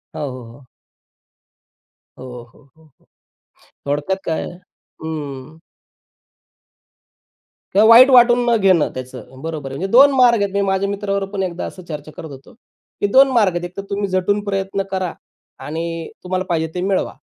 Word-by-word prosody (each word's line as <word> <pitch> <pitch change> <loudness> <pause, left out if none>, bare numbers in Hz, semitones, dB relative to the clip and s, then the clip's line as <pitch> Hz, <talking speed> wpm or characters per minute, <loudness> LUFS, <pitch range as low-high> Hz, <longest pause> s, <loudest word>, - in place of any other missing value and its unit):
हो, - - -5
हो, 130 -1 -9
हो. 130 +3 -17 1.5
हो, 130 - -9 0.3
हो, - - -22
हो, 160 - -22 0.2
हो, - - -32 0.8
थोडक्यात 145 +7 -1
काय 160 - -2 0.6
हं. 150 -1 -7 2.1
किंवा 210 +3 +5
वाईट 245 +4 +9
वाटून 245 -1 +6
न 235 - +4
घेणं 185 -5 +3
त्याचं 130 0 -10
बरोबर 155 -3 -5
आहे. 135 - -6
म्हणजे 190 +4 -4
2 275 +4 +7
मार्ग 240 -4 +5
आहेत. 200 -1 -1
मी 200 - +1
माझ्या 195 0 0
मित्राबरोबर 200 -1 -3
पण 195 -1 -1
एकदा 180 -1 -4
असं 185 - -9
चर्चा 155 -2 -8
करत 160 - -8
होतो 135 0 -13
की 215 -2 -7
2 270 +1 +7
मार्ग 220 -6 +3
आहेत. 175 - -3
एक 175 +1 -11
तर - - -2
तुम्ही 200 0 -2
झटून 190 +2 0
प्रयत्न 195 -1 -2
करा 185 -3 -2 0.5
आणि 165 +1 -5 0.2
तुम्हाला 185 0 -2
पाहिजे 160 -1 0
ते 180 - -2
मिळवा, 190 +1 -1
185 Hz, 160 wpm, -19 LUFS, 160-200 Hz, 2.1 s, वाईट